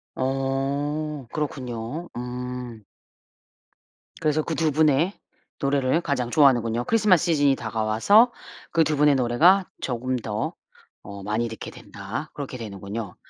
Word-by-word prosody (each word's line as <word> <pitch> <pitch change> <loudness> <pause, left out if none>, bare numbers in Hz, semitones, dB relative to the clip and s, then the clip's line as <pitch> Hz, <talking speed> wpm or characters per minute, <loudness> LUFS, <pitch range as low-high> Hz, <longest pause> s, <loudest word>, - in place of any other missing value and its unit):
어. 135 +2 -2
그렇군요. 135 +1 -4
음. 125 -2 -6 1.4
그래서 155 -1 +2
그 165 - -3
2 160 0 +1
분의 155 +4 +3 0.5
노래를 140 +3 +2
가장 130 -6 -2
좋아하는군요. 120 -5 +4
크리스마스 210 -6 +3
시즌이 145 -5 +3
다가와서 115 - +3 0.4
그 165 - +4
2 155 -1 0
분의 145 -1 +5
노래가 160 +11 +4 0.2
조금 130 0 -2
더 110 -2 -3 0.5
어 100 0 -8
많이 110 +4 -1
듣게 110 -1 -7
된다. 100 +10 -7
그렇게 135 -3 -6
되는군요. 100 -1 -6
135 Hz, 260 characters per minute, -24 LUFS, 115-150 Hz, 1.4 s, 분의